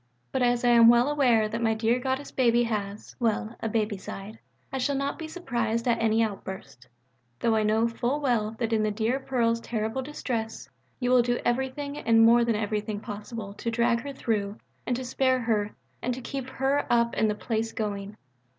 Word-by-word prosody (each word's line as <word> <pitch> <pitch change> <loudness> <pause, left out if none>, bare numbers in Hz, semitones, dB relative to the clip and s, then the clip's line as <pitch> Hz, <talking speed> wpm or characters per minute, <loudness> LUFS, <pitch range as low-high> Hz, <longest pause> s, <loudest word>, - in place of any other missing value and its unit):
But 265 - -1
as 245 0 +2
I - - +5
am 235 -1 +7
well 240 +2 +6
aware 245 -7 +3
that 230 +2 -4
my 225 -1 +2
dear 225 +3 +1
Goddess 265 +2 -2
baby 240 -2 +3
has 210 -3 -4
well, 225 -1 0
a 225 - -2
baby 215 -2 0
side, 200 +3 -8 0.3
I 265 - -1
shall 280 +2 0
not 275 +3 -2
be 320 - -5
surprised 235 -9 -2
at 235 -1 +2
any 225 0 +3
outburst 190 - -6 0.5
though 230 - +2
I 220 - +3
know 220 +2 +2
full 240 +5 -1
well 230 -6 0
that 230 -1 -1
in 220 - +3
the 215 - +1
dear 225 +5 0
Pearl's 235 -4 0
terrible 225 +2 -2
distress, 240 -5 -4 0.3
you 250 -1 0
will 250 -1 +6
do 245 0 0
everything 265 +4 -1
and 225 0 +5
more 235 +1 +6
than 230 -1 +1
everything 210 0 -2
possible 210 -1 -7
to 230 - -4
drag 235 0 +2
her 280 - -6
through 215 -6 -2 0.3
and 245 - +1
to 255 +1 -4
spare 260 0 +1
her 210 -3 0 0.3
and 250 0 -1
to 260 - -7
keep 265 0 -5
her 270 +2 0
up 235 -1 +3
and 220 - +2
the 210 - 0
place 225 +1 -2
going. 205 -1 -4
230 Hz, 200 wpm, -27 LUFS, 220-250 Hz, 0.5 s, am